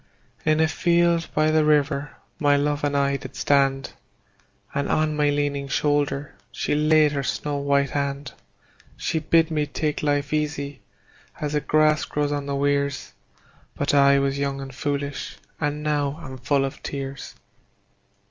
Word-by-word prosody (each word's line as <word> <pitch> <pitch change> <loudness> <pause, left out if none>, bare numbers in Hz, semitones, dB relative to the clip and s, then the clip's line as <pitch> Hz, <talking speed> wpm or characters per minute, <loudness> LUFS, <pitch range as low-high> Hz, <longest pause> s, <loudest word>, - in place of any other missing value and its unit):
In 155 0 +2
a 160 - +4
field 170 0 +2
by 155 0 +3
the 155 0 +3
river 145 -1 +1 0.2
my 145 -2 +4
love 145 +1 0
and 145 -1 +1
I 140 0 +1
did 130 -1 -10
stand, 135 -1 +1 0.8
And 140 0 -1
on 155 -1 +1
my 150 -1 +2
leaning 145 -1 -1
shoulder 145 0 0 0.2
she - - -2
laid 155 0 +4
her 140 -1 -1
snow 145 +2 -2
white 140 -1 +1
hand. 140 0 -3 0.6
She 160 - -1
bid 160 +1 +3
me 150 -2 0
take 150 +1 -2
life 145 0 0
easy, 145 -2 -2 0.6
as 150 0 -3
the 150 - +1
grass 155 0 +3
grows 145 0 -1
on 145 -1 -2
the 140 - -2
weirs; 140 -1 -1 0.6
But 145 - -1
I 140 -1 +6
was 140 0 0
young 140 -1 -1
and 135 -1 -7
foolish, 140 +1 -3 0.2
and 150 -1 -2
now 145 0 -1
am 130 -1 -8
full 135 +2 +1
of 135 - -7
tears. 135 -1 -6
145 Hz, 155 wpm, -24 LUFS, 140-150 Hz, 0.8 s, I